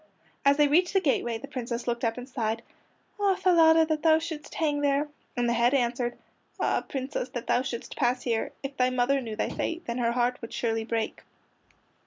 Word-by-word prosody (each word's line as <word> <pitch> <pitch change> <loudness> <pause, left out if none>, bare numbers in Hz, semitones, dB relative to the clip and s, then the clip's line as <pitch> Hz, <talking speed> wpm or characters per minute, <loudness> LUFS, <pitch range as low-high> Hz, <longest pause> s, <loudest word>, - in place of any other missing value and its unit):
As 280 0 +5
they 295 -1 +5
reached 350 +6 +3
the 385 - +5
gateway 260 -8 0
the 240 - -9
Princess 245 -3 -4
looked 240 0 -2
up 230 0 0
and 250 0 -7
sighed: 225 -3 -2 0.6
"Ah, 400 -2 +3
Falada, 325 -3 +5
that 310 -1 -1
thou 315 0 +5
shouldst 320 -2 -6
hang 295 -3 0
there!" 285 +1 +2 0.3
And 240 0 +1
the 235 - +2
head 240 +3 +3
answered: 240 -1 0 0.4
"Ah, - - +1
Princess, 265 -1 -4
that 240 -2 -5
thou 245 - +2
shouldst 250 -2 -5
pass 245 +1 +1
here! 230 -3 -1
If 275 0 -5
thy 250 0 +3
mother 255 +2 +1
knew 225 -3 -5
thy 215 - -1
fate, 335 +1 -3
Then 235 +1 -3
her 235 -1 +1
heart 245 0 0
would 230 - -8
surely 225 -1 -1
break." 225 -1 -2
255 Hz, 205 wpm, -27 LUFS, 235-295 Hz, 0.6 s, As